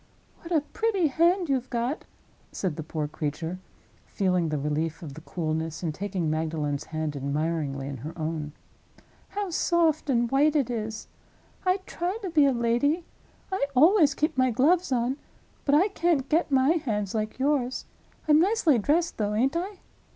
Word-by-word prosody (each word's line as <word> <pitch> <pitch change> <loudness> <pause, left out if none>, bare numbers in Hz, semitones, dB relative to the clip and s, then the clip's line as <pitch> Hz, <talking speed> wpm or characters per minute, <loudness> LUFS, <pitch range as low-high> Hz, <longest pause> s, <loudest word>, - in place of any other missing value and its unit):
"What 335 - -11
a 320 -3 +3
pretty 405 +3 0
hand 345 +5 +3
you've 260 -3 -1
got!" 245 +5 -2 0.5
said 180 -6 -2
the 160 - -5
poor 155 -1 -3
creature, 160 +4 -4 0.5
feeling 180 -4 +1
the 150 - -1
relief 150 +3 -2
of 145 -4 -7
the 160 - -10
coolness 160 0 -3
and 160 -3 -1
taking 185 -1 -2
Magdalen's 155 -2 -1
hand, 155 -2 -3
admiringly, 140 0 -2
in 140 -1 -5
her 150 +8 -8
own. 155 -2 -3 0.8
"How 405 -2 -3
soft 330 -2 +2
and 235 -2 +2
white 290 +3 +3
it 270 -5 +1
is! 220 -1 -4 0.6
I 370 +1 +3
try 360 +4 -3
to 375 - -3
be 300 -3 +5
a - - +4
lady; 245 +8 +1 0.5
I 380 - 0
always 310 +1 +5
keep 305 - 0
my 255 0 +4
gloves 310 +9 +2
on—but 260 +3 -2
I 370 +7 +4
can't 335 -8 +1
get 325 +2 +2
my 265 0 +4
hands 220 - 0
like 215 -1 -2
yours. 265 -2 0 0.4
I'm 300 0 +6
nicely 355 - +3
dressed, 320 - +1
though, 210 0 0
ain't 265 +8 +2
I? 370 +3 -3
245 Hz, 165 wpm, -27 LUFS, -, 0.8 s, I'm